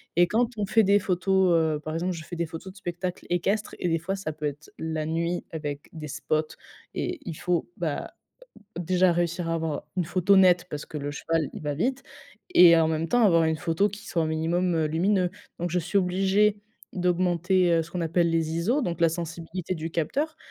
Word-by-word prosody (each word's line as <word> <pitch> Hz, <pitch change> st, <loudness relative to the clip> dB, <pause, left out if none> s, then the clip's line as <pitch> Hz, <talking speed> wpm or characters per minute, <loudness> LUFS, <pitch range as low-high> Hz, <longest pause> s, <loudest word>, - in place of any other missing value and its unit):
et 175 Hz, +1 st, +5 dB
quand 235 Hz, +5 st, +2 dB
on 210 Hz, -, 0 dB
fait 220 Hz, +3 st, +4 dB
des 200 Hz, +1 st, +4 dB
photos, 190 Hz, 0 st, +2 dB
heu, 160 Hz, -2 st, +2 dB
par 155 Hz, +1 st, -6 dB
exemple, 180 Hz, +3 st, -1 dB
je 165 Hz, -2 st, -7 dB
fais 175 Hz, +2 st, -8 dB
des 170 Hz, -, 0 dB
photos 165 Hz, +4 st, -8 dB
de 190 Hz, -, -18 dB
spectacles 180 Hz, 0 st, -5 dB
équestres 195 Hz, +5 st, 0 dB
et 175 Hz, -, 0 dB
des 165 Hz, -, +2 dB
fois 185 Hz, +4 st, -3 dB
ça 195 Hz, -5 st, -4 dB
peut 155 Hz, 0 st, -6 dB
être 145 Hz, +1 st, -5 dB
la 160 Hz, -1 st, -2 dB
nuit 170 Hz, +2 st, -1 dB
avec 145 Hz, -3 st, -5 dB
des 155 Hz, -2 st, -7 dB
spots 155 Hz, +2 st, -2 dB, 0.4 s
et 360 Hz, -2 st, -3 dB
il 170 Hz, -, -4 dB
faut, 175 Hz, -, -1 dB
bah -, -, -3 dB, 0.7 s
heu, -, -, -1 dB
déjà 185 Hz, +1 st, +3 dB
réussir 170 Hz, 0 st, -1 dB
à -, -, +1 dB
avoir 160 Hz, -3 st, -2 dB
une 180 Hz, -, +1 dB
photo 185 Hz, +4 st, +3 dB
nette 180 Hz, -2 st, +5 dB
parce 150 Hz, 0 st, -5 dB
que -, -, -8 dB
le 145 Hz, 0 st, -4 dB
cheval 160 Hz, 0 st, -1 dB
il -, -, -7 dB
va 145 Hz, -1 st, -2 dB
vite 255 Hz, -, -1 dB, 0.5 s
et 170 Hz, -1 st, +9 dB
en 165 Hz, -1 st, +4 dB
même 160 Hz, +1 st, -1 dB
temps, 245 Hz, -1 st, +3 dB
avoir 170 Hz, -5 st, +5 dB
une 160 Hz, 0 st, +1 dB
photo 165 Hz, +5 st, +1 dB
qui 205 Hz, +2 st, -10 dB
soit 170 Hz, -, 0 dB
un -, -, 0 dB
minimum, 170 Hz, +3 st, 0 dB
heu, 160 Hz, -1 st, +2 dB
lumineux. 180 Hz, +4 st, +1 dB, 0.3 s
Donc 175 Hz, +1 st, -2 dB
je 180 Hz, -, +1 dB
suis 175 Hz, +4 st, +1 dB
obligée 195 Hz, +3 st, +2 dB, 0.3 s
d'augmenter, 180 Hz, 0 st, +2 dB
heu, 165 Hz, -1 st, +3 dB
ce 165 Hz, -, -11 dB
qu'on 180 Hz, -, -3 dB
appelle 170 Hz, +1 st, +2 dB
les 165 Hz, -1 st, 0 dB
ISO, 210 Hz, -, +1 dB
donc 170 Hz, -6 st, -3 dB
la 170 Hz, -, +5 dB
sensibilité 170 Hz, +2 st, -4 dB
du 165 Hz, 0 st, -5 dB
capteur 280 Hz, -, -1 dB
170 Hz, 220 wpm, -26 LUFS, 160-185 Hz, 0.7 s, et